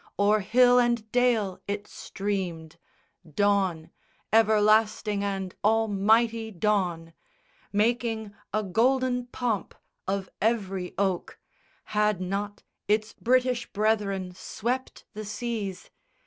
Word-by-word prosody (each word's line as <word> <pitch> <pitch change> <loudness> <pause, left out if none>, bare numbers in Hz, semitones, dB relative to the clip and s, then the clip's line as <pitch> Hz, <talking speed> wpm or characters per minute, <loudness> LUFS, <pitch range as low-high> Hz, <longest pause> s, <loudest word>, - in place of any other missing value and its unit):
O'er 205 +1 +4
hill 245 +5 +5
and 235 -3 0
dale 230 -7 +2
it 205 0 -3
streamed, 175 -5 -4 0.6
Dawn, 190 -5 +1 0.4
everlasting 215 -1 +3
and 195 -2 -3
almighty 220 +1 +2
dawn, 180 -5 -1 0.6
Making 220 0 0 0.2
a 215 0 0
golden 250 +4 +1
pomp 240 -5 -2 0.3
of 195 0 -1
every 195 -5 -1
oak 190 -3 -1 0.6
Had 210 -2 +2
not 200 +3 -4 0.2
its 215 +1 +1
British 250 0 +1
brethren 200 -3 0
swept 245 +7 -4
the 215 0 -6
seas? 210 -3 -5
210 Hz, 95 wpm, -27 LUFS, 195-225 Hz, 0.6 s, hill